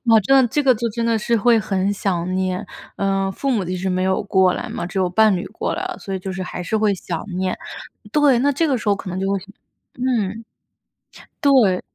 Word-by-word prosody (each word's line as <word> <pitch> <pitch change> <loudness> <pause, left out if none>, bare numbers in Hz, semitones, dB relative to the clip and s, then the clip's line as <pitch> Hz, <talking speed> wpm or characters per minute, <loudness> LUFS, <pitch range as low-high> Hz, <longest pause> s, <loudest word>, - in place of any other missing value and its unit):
我 225 -2 +5
真 270 +7 +3
的 260 - +5
这 295 +5 0
个 260 -2 +5
就 235 +2 -2
真 230 +2 -3
的 230 -1 +2
是 235 +2 0
会 230 +2 +4
很 195 -2 0
想 185 -3 -2
念。 185 +1 -1 0.3
呃， 195 -1 0
父 275 - -2
母 220 -7 +1
其 180 +1 -3
实 185 +1 -2
没 185 0 0
有 190 +2 +1
过 190 -2 +3
来 - - -5
嘛， - - -4
只 195 +1 -4
有 185 - +2
伴 215 +3 +4
侣 180 - -3
过 220 - -3
来 360 - -4
了， 370 -1 -5
所 195 - -6
以 190 - -2
就 190 +1 -6
是 185 0 -4
还 180 0 -5
是 220 - -1
会 215 -2 +2
想 175 -3 -5
念。 185 0 -1 0.6
对， 290 -4 +4
那 285 +2 +2
这 315 +3 +1
个 265 - +2
时 215 - -3
候 205 - +4
可 195 - -8
能 185 - -4
就 195 - -1
会 200 - +1 0.6
嗯， 230 -4 -1 1.0
对。 245 -10 +4
200 Hz, 255 characters per minute, -21 LUFS, 185-235 Hz, 1.0 s, 我